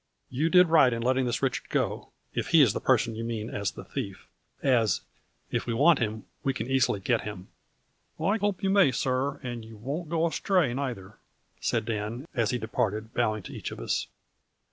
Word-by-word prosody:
" - - -48
You 160 +2 +3
did 180 0 +6
right 155 -6 +6
in 115 0 -3
letting 130 +1 +2
this 120 +3 -2
Richard 130 -2 -1
go, - - -1 0.2
if - - -2
he - - +7
is - - +3
the - - -3
person 115 - +2
you 110 +1 -5
mean 115 -1 -4
as 100 -1 -1
the - - -9
thief, 100 -1 -5 0.4
as, 120 -7 +3 0.5
if - - -1
we 115 - 0
want 155 +5 +5
him, 110 -2 -2 0.2
we 135 -1 0
can 110 - -3
easily 130 -5 +2
get 115 +4 +1
him." 100 -3 -7 0.4
" - - -43
I 195 +7 +2
hope 205 -2 -1
you 190 - +2
may, 195 -8 +5
sir, 130 +2 0
and 120 -2 -5
you 110 0 -12
won't 145 +9 -4
go 165 0 +1
as 165 - -1
tray 180 -11 +2
nayther," 120 -7 -5 0.4
said 115 -2 0
Dan, 115 +5 -3
as 115 -5 +1
he 125 - 0
departed 110 -1 -2
bowing 110 -4 0
to - - -9
each - - -5
of - - -8
us. - - -1
120 Hz, 210 wpm, -28 LUFS, 110-140 Hz, 0.5 s, he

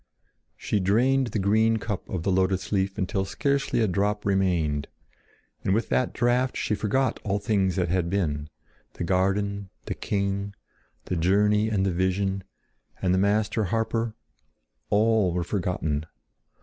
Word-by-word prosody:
She 105 - -1
drained 125 +8 +3
the 115 - -3
green 110 +3 +3
cup 105 -3 -4
of 90 -4 -3
the 95 - +1
lotus 95 0 +1
leaf 95 -1 0
until 95 -1 -1
scarcely 140 +5 0
a 110 - +3
drop 105 +3 0
remained, 85 -7 +1 0.8
and 95 - +2
with 115 - -1
that 130 - +1
draught 125 +1 +1
she - - -1
forgot 115 +6 0
all 100 -1 0
things 100 -3 +1
that 90 -3 0
had 90 -1 0
been—the 75 -3 -4
garden, 100 +2 0 0.2
the - - -2
king, 100 0 -2 0.5
the - - -2
journey 105 +5 +3
and 100 -3 +1
the 95 - 0
vision, 95 +2 0 0.6
and 90 -1 +1
the 95 - +3
master 105 +2 +1
harper—all 110 - -1
were 90 0 0
forgotten. 85 -5 -2
100 Hz, 140 wpm, -26 LUFS, 90-110 Hz, 0.8 s, drained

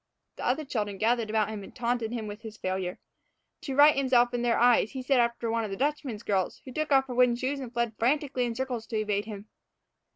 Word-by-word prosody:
The - - -5
other 275 +5 0
children 205 -6 -3
gathered 230 +1 +1
about 215 -1 +1
him 210 -2 -6
and - - -13
taunted 240 -2 -1
him 235 -3 -3
with 210 +1 -7
his 220 -1 -9
failure. 185 -1 -3 0.6
To 280 -6 -4
right 295 +2 +7
himself 250 -3 +3
in 240 - -1
their 240 -1 +2
eyes 240 -3 +4
he 260 -1 -5
set 265 0 +3
after 235 -1 0
one 230 0 0
of 215 - -4
the 195 - -5
Dutchman's 270 -5 -2
girls, 195 -4 -1
who 260 - -9
shook 310 -1 -2
off 270 -1 +5
her 255 - -6
wooden 250 -1 +4
shoes 260 +3 -2
and 255 -4 -7
fled 235 -2 -1
frantically 260 0 +1
in 235 -1 -3
circles 250 -3 -3
to 225 - -3
evade 210 -1 -1
him. 210 -1 -8
235 Hz, 235 wpm, -28 LUFS, 215-260 Hz, 0.6 s, right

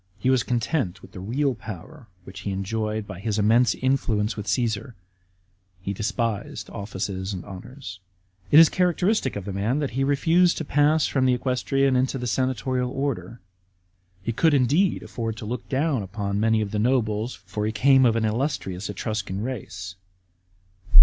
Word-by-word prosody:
He 125 +7 +1
was 130 -2 +4
content 120 - -1
with - - -13
the - - -9
real 130 +8 0
power 110 - -9 0.2
which 95 +1 -10
he 100 - -3
enjoyed 105 +2 -2
by 95 -3 -8
his 105 0 -2
immense 115 +3 +4
influence 115 -5 0
with 105 0 -6
Csesar; 120 0 -1 0.8
he 95 +2 -3
despised 110 +1 -2
offices 100 -1 -4
and 90 - -6
honours. 100 +1 -9 0.5
It 145 - +6
is 165 0 +10
characteristic 180 - +1
of 100 -2 -5
the 100 - -4
man 105 +7 0
that 145 -2 -1
he 135 +3 0
refused 165 +6 +3
to 160 - -3
pass 145 +2 +3
from 130 -2 +1
the 125 - +4
equestrian 135 +2 +1
into 130 +1 +1
the 125 - -4
senatorial 130 +1 0
order. 135 -4 -3 0.8
He 115 - -1
could 155 +6 +3
indeed 145 +9 +2
afford 115 -2 -4
to 115 - -7
look 120 +4 -5
down 140 -2 +1
upon 100 +1 -3
many 110 0 +3
of 100 -2 -3
the 105 - -1
nobles; 115 -1 +1
for 95 +3 -5
he - - 0
came 130 +5 +5
of 115 -3 +4
an 115 -1 +1
illustrious 105 -5 -2
Etruscan 100 -1 -3
race. 95 -7 -5
115 Hz, 170 wpm, -25 LUFS, 105-135 Hz, 0.8 s, is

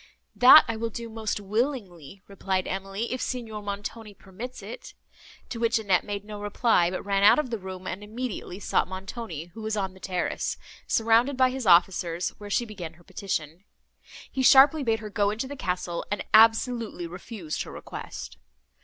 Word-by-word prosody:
"That 255 +5 +9
I 230 -1 -2
will 230 +1 -2
do 230 +1 -7
most 220 -2 -3
willingly," 200 - -3
replied 190 -1 -2
Emily, 195 +5 -3
"if 255 - -3
Signor 225 -4 -4
Montoni 205 +1 -6
permits 215 +8 -9
it;" - - -9 0.5
to 230 - -5
which 235 0 +2
Annette 195 -5 +2
made 205 -1 -5
no 210 -1 -8
reply, 205 -3 +2
but 185 - -5
ran 200 -1 +1
out 205 +8 +7
of 295 -5 -1
the 230 - -2
room, 185 -1 -8
and 195 +2 -5
immediately 215 -3 -5
sought - - +1
Montoni, 185 -3 -7
who 225 - -9
was 215 0 -2
on 190 -2 -2
the 190 - -16
terrace, 180 -2 -2 0.3
surrounded 230 +4 +3
by 255 -1 +4
his 260 -4 -4
officers, 175 -1 +3
where 205 -1 -8
she 240 +4 +1
began 185 -7 -8
her 175 +2 -21
petition. 180 -3 -4 0.7
He 265 - -2
sharply 275 +4 +7
bade 225 -4 0
her 215 -1 -7
go 205 0 +1
into 220 +5 -3
the 285 - -7
castle, 180 -7 -3
and 205 - -2
absolutely 225 -3 +4
refused 180 -1 -6
her - - -6
request. - - -8
205 Hz, 180 wpm, -26 LUFS, 185-230 Hz, 0.7 s, That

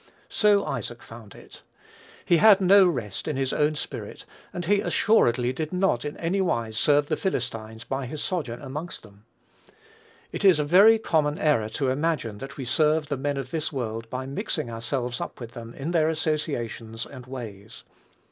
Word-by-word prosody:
So 205 -2 +3
Isaac 120 -1 -5
found 115 -4 -12
it. - - -14 0.6
He 175 - +4
had 205 +1 +7
no 195 0 +6
rest 120 - -3
in 150 -3 -2
his 135 -1 -1
own 150 +1 +1
spirit; - - -6 0.3
and 175 -1 -5
he 200 +3 +3
assuredly 125 - +2
did 155 +3 -4
not 180 -9 +1
in 145 0 -5
any 180 +4 0
wise 115 -11 -1
serve 145 +5 +3
the 155 - -1
Philistines 115 - -3
by 135 +1 -3
his 155 +4 -6
sojourn 145 -9 -3
amongst 150 +6 -6
them. 105 0 -18 1.1
It - - -5
is 190 -5 +6
a 150 - +1
very 200 +8 +7
common 155 -8 0
error 115 -9 +2
to 135 -2 +1
imagine 130 -7 -1
that 135 +2 -8
we 135 - -5
serve 150 +3 +2
the 145 - 0
men 140 +1 -2
of 135 -1 -5
this 160 -1 -2
world 115 -4 -4
by 130 +2 -4
mixing 135 -3 -3
ourselves 120 +1 -3
up - - -6
with 120 -2 -8
them 115 -1 -9
in 145 +5 -4
their 160 -2 +3
associations 130 -8 -2
and 130 -3 -11
ways. 110 -4 -9
140 Hz, 180 wpm, -25 LUFS, 120-160 Hz, 1.1 s, had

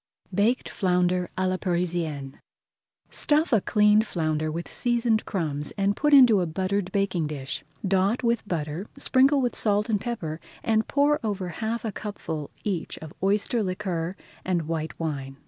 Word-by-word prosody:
BAKED 215 +7 +2
FLOUNDER 180 -1 +1
À 185 0 +1
LA 185 0 0
PARISIENNE 170 -7 -2 0.7
Stuff 305 -1 +2
a 220 - +5
cleaned 210 +1 +4
flounder 155 -3 -1
with 170 +2 -4
seasoned 235 -2 +1
[Page - - -10
139] 160 -6 0
crumbs 145 - -5
and 200 0 +2
put 295 +5 +1
into 245 -8 +7
a 175 - 0
buttered 185 +3 -1
baking 190 -6 0
dish. 140 -3 -5 0.2
Dot 195 +6 +2
with 235 -2 +1
butter, 160 +2 -3
sprinkle 275 +1 +4
with 245 -1 0
salt 210 0 +1
and 210 -3 +1
pepper, 165 -10 -4 0.2
and 220 -1 +2
pour 290 +1 +3
over 200 -4 -2
half 220 +6 -3
a 220 - -1
cupful 160 -8 -5
each 185 -6 -3
of 160 -1 -9
oyster 205 +4 +1
liquor 185 -3 -2 0.3
and 180 -3 0
white 160 -1 -3
wine. 135 -4 -4
190 Hz, 165 wpm, -26 LUFS, 165-220 Hz, 0.7 s, into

